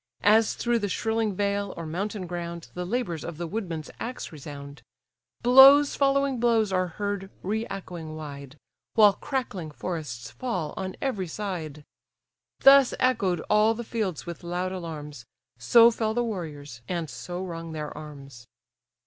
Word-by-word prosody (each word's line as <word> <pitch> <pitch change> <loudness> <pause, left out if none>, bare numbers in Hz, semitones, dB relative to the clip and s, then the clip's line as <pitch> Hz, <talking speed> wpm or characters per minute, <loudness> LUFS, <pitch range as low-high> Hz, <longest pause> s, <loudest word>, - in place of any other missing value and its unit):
As 215 +2 +5
through 240 -1 +1
the 205 -2 -2
shrilling 220 0 -1
vale, 200 0 -1
or 165 - -5
mountain 195 +4 -3
ground, 170 -1 -6
The 180 0 -4
labours 190 -8 -2
of 170 -3 -6
the 170 - -3
woodman's 170 -5 -4
axe 250 +2 -5
resound; 140 -1 -9 0.6
Blows 270 +4 +8
following 275 -2 +2
blows 225 -4 +2
are 185 0 +1
heard 200 +2 -4
re 220 +4 -2
echoing 175 -5 -7
wide, 140 -2 -8 0.4
While 210 -3 +7
crackling 210 - -4
forests 150 -7 -5
fall 185 -12 -3
on 185 0 -4
every 210 -9 -1
side: 160 -6 -5 0.8
Thus 275 -1 +7
echoed 200 -10 +1
all 215 +2 +3
the 235 - -5
fields 200 - -3
with 170 -1 -7
loud 180 +2 -2
alarms, 150 -8 -7 0.3
So 230 - +7
fell 220 -1 -1
the 240 - +2
warriors, 150 - -6
and 170 -3 -2
so 175 +9 -6
rung 165 -2 -6
their 150 -1 -5
arms. 140 -5 -11
185 Hz, 150 wpm, -26 LUFS, 155-220 Hz, 0.8 s, Blows